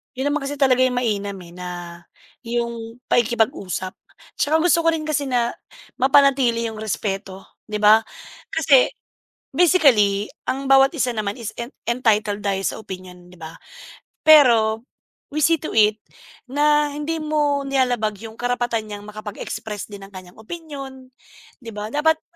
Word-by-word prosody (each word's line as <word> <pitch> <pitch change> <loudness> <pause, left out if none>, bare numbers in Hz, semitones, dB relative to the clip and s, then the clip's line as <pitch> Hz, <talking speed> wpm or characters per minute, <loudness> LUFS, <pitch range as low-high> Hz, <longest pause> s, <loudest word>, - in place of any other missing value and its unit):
'Yun 265 +3 -1
naman 295 -1 -1
kasi 285 +1 -3
talaga 255 -2 +4
'yung 250 - 0
mainam, 205 -5 -1
eh, 170 -1 -13
na 180 +1 -8 0.8
'yung 235 0 -4
pakikipag-usap. 215 -5 0 0.4
Tsaka 300 +2 +2
gusto 345 -1 +4
ko - - +6
rin 315 -1 -3
kasi 290 -2 0
na 240 -2 +1 0.5
mapanatili 265 -3 +3
'yung 220 - -9
respeto 195 -2 -4 0.2
di 210 -1 -3
ba, 215 +1 +8 0.5
kasi - - +4 0.7
basically 245 - +4 0.2
ang 270 +1 -2
bawat 270 0 +6
isa 255 -3 0
naman 210 0 -3
is 225 -3 -6
en 235 0 -6 0.2
entitled 215 -4 +1
tayo 200 -1 -1
sa - - -3
opinyon 180 -3 -10
di 180 - -16
ba, 160 -1 -9 0.7
pero 235 -7 +5 0.5
we 305 - -1
see 330 +2 +4
to 310 - -6
it 215 -1 +4 0.5
na 295 +2 +2
hindi 300 +2 -3
mo 300 -2 0
nilalabag 250 -6 0
'yung 225 0 -10
karapatan 240 -2 -1
niyang 205 -1 -8
makapag-express 210 0 -7
din 200 -1 -9
ng 195 - -18
kaniyang 185 -1 -12
opinyon 270 0 -9 0.5
di 230 -4 -10
ba, 210 +1 -5
dapat 315 +5 +1
235 Hz, 150 wpm, -21 LUFS, 210-275 Hz, 0.8 s, ba